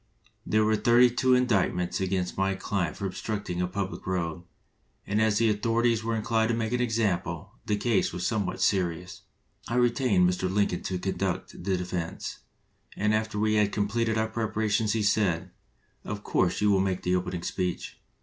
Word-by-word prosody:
"There 110 0 +3
were 110 0 +3
thirty 120 +2 +5
two 130 +1 +3
indictments 95 -8 +1
against 95 -1 -1
my 95 0 0
client 95 -5 -2
for 100 - -4
obstructing 95 -2 -3
a 90 - 0
public 95 0 -4
road, 85 -2 -2 0.6
and 105 +2 0
as 110 -1 +3
the 115 - +3
authorities 115 +1 +1
were 115 0 -1
inclined 110 0 +1
to 115 - +1
make 115 0 -2
an 125 - +1
example, 100 -6 -1 0.2
the 105 - +1
case 110 -2 +1
was 90 0 -4
somewhat 105 -5 -1
serious. 90 -2 0 0.5
I 120 - -2
retained 120 -6 +3
Mr. 90 +1 -1
Lin 100 +1 +2
coln 90 - -3
to 95 - -3
conduct 95 0 -2
the 95 0 0
defense, 90 -2 -4 0.6
and 105 +1 +1
after 110 -1 -1
we 110 +1 +2
had 105 -1 +3
completed 110 +2 0
our 110 0 +1
preparations 110 -1 0
he 110 -2 0
said, 95 -4 +1 0.5
'Of 105 -1 -5
course 90 +2 +1
you 105 0 +4
will 95 - +4
make 95 -1 -1
the 90 0 +1
opening 90 -1 -3
speech.' 90 -2 -3
100 Hz, 180 wpm, -27 LUFS, 90-110 Hz, 0.6 s, thirty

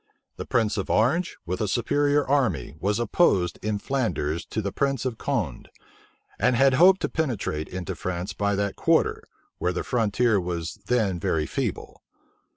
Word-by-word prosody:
The - - -6
prince 110 -2 +1
of 100 - -3
Orange, 155 +11 +1
with 90 +3 -3
a 105 - +1
superior 145 +7 +1
army, 125 - +1
was 100 +4 0
opposed 105 - +2
in 105 0 -1
Flanders 90 - -2
to - - -3
the 100 -2 -2
prince 135 +2 -1
of 120 -3 -3
Condé, 105 - -2 0.7
and 125 +4 +3
had 135 +2 +4
hoped 180 +7 +6
to - - +1
penetrate 115 - -2
into 95 +1 -5
France 90 +3 -4
by 100 0 0
that 100 0 -1
quarter, - - +2 0.4
where 90 - 0
the 90 - -2
frontier 115 -1 +1
was 85 +2 -4
then 105 -8 +1
very 80 -2 0
feeble. - - -4
105 Hz, 160 wpm, -25 LUFS, 90-130 Hz, 0.7 s, hoped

